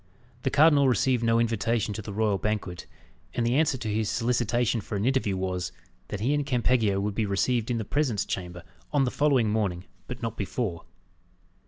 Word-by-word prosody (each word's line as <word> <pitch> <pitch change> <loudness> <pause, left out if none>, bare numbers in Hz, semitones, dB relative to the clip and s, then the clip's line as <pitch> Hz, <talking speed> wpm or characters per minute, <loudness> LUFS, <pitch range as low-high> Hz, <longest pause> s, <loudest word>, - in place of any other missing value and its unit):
The 135 - 0
cardinal 145 -1 +5
received 125 -1 +2
no 115 0 +3
invitation 115 -1 0
to 110 - -5
the 105 - -7
royal 105 -1 +1
banquet; 105 -4 -3 0.5
and 120 - 0
the 120 - +2
answer 145 -1 +2
to 115 - -5
his 110 0 0
solicitation 120 -1 +1
for 105 - -6
an 100 +2 -1
interview 125 -7 +1
was, 90 -1 -2 0.4
that 100 - -5
he 130 +6 +2
and 145 0 +1
Campeggio 120 -6 +1
would 105 +1 -1
be 105 0 -1
received 115 +4 0
in 120 - 0
the 110 - -3
presence 130 -5 0
chamber 90 -2 -5 0.3
on 145 -2 +3
the 125 - 0
following 135 -7 +2
morning, 100 -4 -1 0.2
but 125 -1 -7
not 115 0 -3
before. 100 -4 -3
115 Hz, 190 wpm, -27 LUFS, 100-125 Hz, 0.5 s, cardinal